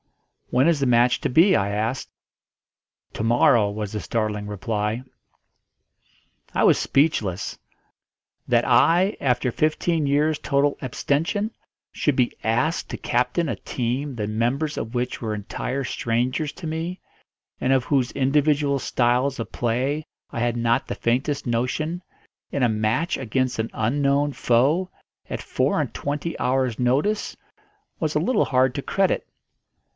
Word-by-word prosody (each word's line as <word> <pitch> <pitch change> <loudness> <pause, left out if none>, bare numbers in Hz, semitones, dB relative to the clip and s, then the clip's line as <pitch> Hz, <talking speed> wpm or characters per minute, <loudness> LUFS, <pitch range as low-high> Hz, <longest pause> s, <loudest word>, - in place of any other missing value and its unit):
"When 130 +5 +3
is 165 -3 +3
the 135 - +1
match 120 0 +3
to - - 0
be?" 170 +9 +5
I 100 -2 +1
asked. 110 +5 -2 1.0
"To - - -4
morrow," 115 -1 +4
was 105 -1 -4
the 105 - -3
startling 105 -2 -2
reply. 105 +3 -2 1.5
I - - +1
was - - +6
speechless. 115 - 0 0.9
That - - +3
I, 175 +6 +4
after 125 -1 +1
fifteen 155 +2 0
years' 150 +2 +2
total 140 0 +1
abstention, 165 - -1 0.4
should 145 - +1
be 125 -2 +1
asked 120 +10 0
to - - -4
captain 125 +8 0
a - - -1
team 130 +3 -3
the 105 -3 -3
members 120 +8 -1
of 110 +2 -5
which 125 +1 -2
were 110 -2 -2
entire 125 +6 -4
strangers 125 +6 -1
to 165 - -7
me, 165 +4 -3 0.6
and 130 - +1
of 130 -2 +3
whose 135 -4 +1
individual 140 +1 +2
styles 125 +2 +1
of 115 - -5
play 130 +6 -1 0.3
I 120 - -4
had 120 0 0
not 120 +2 +1
the - - -3
faintest 135 +4 -1
notion, 140 +9 -1 0.5
in 140 - 0
a - - +5
match 110 - 0
against 130 0 -1
an 110 - -1
unknown 140 +5 +1
foe, 140 +12 +2 0.4
at - - -4
four - - 0
and - - -2
twenty 150 +4 -3
hours' 130 -2 0
notice, 140 +13 0 0.6
was 155 -2 -1
a - - +4
little 205 +8 +2
hard 130 -1 +2
to 140 - -2
credit. 195 +6 0
130 Hz, 145 wpm, -23 LUFS, 115-150 Hz, 1.5 s, was